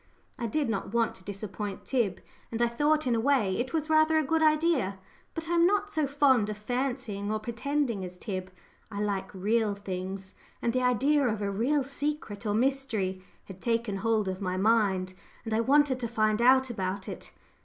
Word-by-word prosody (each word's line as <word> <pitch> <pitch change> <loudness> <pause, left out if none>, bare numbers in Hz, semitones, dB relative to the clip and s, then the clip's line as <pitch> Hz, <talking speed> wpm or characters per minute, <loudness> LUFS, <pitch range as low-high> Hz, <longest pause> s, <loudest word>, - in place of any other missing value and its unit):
I 235 - -1
did 285 +5 0
not 220 0 -3
want 230 -1 +2
to 190 - -16
disappoint 200 0 -5
Tib, 225 -9 0 0.3
and 230 - -3
I 240 - +4
thought, 295 +5 +1
in 250 - +2
a 230 - +2
way, 230 -7 +2
it 255 +2 -2
was 315 -2 -1
rather 315 0 +4
a 315 - +3
good 320 +3 +1
idea. 305 - +2 0.4
But 325 0 -4
I 345 - -1
am 340 0 +5
not 410 +1 +1
so 310 -6 +1
fond 265 -6 +3
of 210 - -4
fancying 240 -3 -2
or 215 - +1
pretending 235 -1 -2
as 180 0 -7
Tib 185 -1 -5 0.4
I 200 -2 -5
like 200 -2 -2
real 210 +2 0
things. 190 -1 -5 0.3
And 235 - 0
the 255 - +1
idea 265 +3 +3
of 220 -2 -1
a 200 - -1
real 265 +8 +1
secret 275 -6 -4
or 205 - +1
mystery 225 -7 0 0.2
had 190 -1 -11
taken 230 -3 0
hold 215 0 +1
of 190 +1 -3
my 185 -1 -1
mind, 195 -3 +2 0.3
and 225 - -2
I 220 - +2
wanted 270 +2 +3
to 240 - -2
find 215 -1 +1
out 260 +1 +5
about 190 -2 -3
it. - - -8
230 Hz, 195 wpm, -28 LUFS, 200-275 Hz, 0.4 s, am